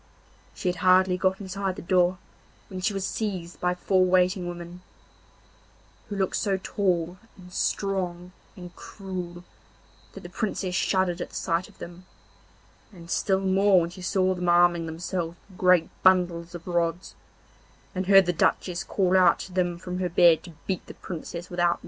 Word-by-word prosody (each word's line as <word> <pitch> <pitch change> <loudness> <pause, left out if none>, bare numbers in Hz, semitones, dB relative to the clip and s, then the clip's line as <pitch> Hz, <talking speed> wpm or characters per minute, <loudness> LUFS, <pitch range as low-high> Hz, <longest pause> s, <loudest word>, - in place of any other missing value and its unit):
She - - -4
had 180 0 0
hardly 185 +1 +4
got 190 +1 0
inside 190 -1 -3
the - - -8
door 180 +1 +2 0.5
when 185 -1 -6
she 190 - +1
was 195 -1 -3
seized 185 -6 -4
by 180 0 +1
four 185 +1 +2
waiting 185 0 +2
women, 175 0 -8 1.3
who 205 - -4
looked 190 -2 0
so 195 -2 0
tall 180 -2 -1 0.2
and 180 -1 -14
strong 180 -3 -2 0.2
and 180 -1 -11
cruel 180 -3 -7 0.7
that - - -9
the - - -8
Princess 200 -4 -3
shuddered 185 -1 +1
at - - -4
the - - -14
sight 170 +1 -1
of - - -21
them, 175 +1 -10 0.8
and 170 -3 -12
still 190 -1 +1
more 195 0 +4
when 170 +1 -3
she 185 - -11
saw 185 +1 +1
them 180 -1 -2
arming 175 -1 +4
themselves 170 +1 -4
with 190 -2 -17
great 180 -3 +4
bundles 175 -2 +2
of 170 - -9
rods, 170 0 -1 0.8
and 185 0 -3
heard 195 -1 +7
the 175 - 0
Duchess 175 +2 0
call 190 -2 +1
out 185 -1 +5
to 185 - -9
them 175 -2 0
from 180 +1 -5
her 180 -1 -1
bed 170 -2 +5
to 170 - -11
beat 185 -3 -2
the - - -10
Princess 175 0 -7
without 175 -1 +2
mercy. - - -13
180 Hz, 175 wpm, -26 LUFS, 175-190 Hz, 1.3 s, heard